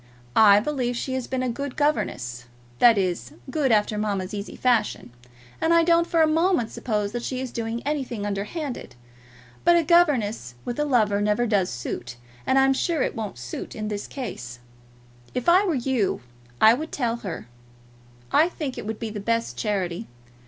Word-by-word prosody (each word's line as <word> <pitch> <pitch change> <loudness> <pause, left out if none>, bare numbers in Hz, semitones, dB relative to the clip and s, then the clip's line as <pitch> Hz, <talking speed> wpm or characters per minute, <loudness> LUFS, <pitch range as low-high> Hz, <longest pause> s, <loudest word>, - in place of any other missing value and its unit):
I 205 -2 +8
believe 250 0 -1
she 260 - -3
has 260 -2 -2
been 260 -1 -2
a 255 - 0
good 280 +3 -4
governess, 120 - -1 0.3
that 235 -3 +7
is, 175 -11 -1 0.2
good 285 -5 +1
after 210 -1 +2
mamma's 200 -2 -2
easy 205 0 -5
fashion; 220 - +1 0.5
and 330 +1 +4
I 335 - +6
don't 335 0 +3
for 330 -2 +3
a - - +4
moment 320 - +2
suppose 210 -3 -2
that 240 +1 -3
she 255 +1 -3
is 260 -2 -4
doing 230 0 -3
anything 265 -8 -2
underhand. 205 - -4 0.7
But 345 +1 +6
a 340 - +4
governess 250 - +2
with 240 +3 -4
a 295 - +2
lover 215 -7 +2
never 210 +3 +2
does 200 -5 +1
suit, 120 0 -5 0.3
and 265 - +3
I'm 270 0 +5
sure 320 +1 0
it - - -2
won't 215 - -5
suit 125 0 -7
in 215 -1 -4
this 205 -1 -4
case. 125 - -6 0.8
If 250 - -2
I 365 +4 +6
were 340 - +1
you 245 - 0 0.4
I 220 - +8
would 310 +6 -4
tell 240 -4 -1
her. 190 - -6 0.8
I 320 +3 +5
think 295 -7 -5
it - - -7
would 220 0 -3
be 225 -2 -4
the 210 - -5
best 230 +3 -1
charity. 190 -5 -2
235 Hz, 180 wpm, -25 LUFS, 205-280 Hz, 0.8 s, I